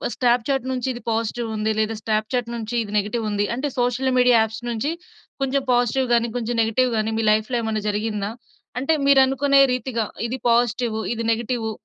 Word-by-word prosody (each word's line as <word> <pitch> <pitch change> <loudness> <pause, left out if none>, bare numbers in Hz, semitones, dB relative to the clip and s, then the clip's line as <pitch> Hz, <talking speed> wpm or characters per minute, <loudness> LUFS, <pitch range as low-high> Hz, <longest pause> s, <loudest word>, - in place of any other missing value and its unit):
Snapchat 250 +1 +1
నుంచి 255 -1 -2
ఇది 240 - -9
పాజిటివుంది, 220 -1 -1
లేదా, 220 +1 0
స్టాప్‌చాట్ 225 +2 -1
నుంచి 230 0 -5
ఇది 205 -1 -9
నెగెటివుంది. 210 0 -1
అంటే, 280 +4 -2
సోషల్ 245 +2 +1
మీడియా 250 -1 +5
యాప్స్ 220 +1 -3
నుంచి 240 +6 -1 0.5
కొంచెం 270 0 0
పాజిటివ్ 245 +2 +1
గానీ, 235 0 +2
కొంచెం 240 0 -2
నెగెటివ్ 245 +3 +1
గానీ, 215 +1 -1
మీ 225 - 0
లైఫ్‌లో 220 +3 +1
ఏమన్నా 220 -2 -2
జరిగిందా? 210 -1 -2 0.5
అంటే, 275 +5 +1
మీరనుకునే 275 0 +5
రీతిగా 245 -2 -2 0.2
ఇది 255 +3 -4
పాజిటివు, 235 -1 +1
ఇది 230 0 -4
నెగెటివు 230 0 -2
235 Hz, 155 wpm, -22 LUFS, 220-250 Hz, 0.5 s, మీడియా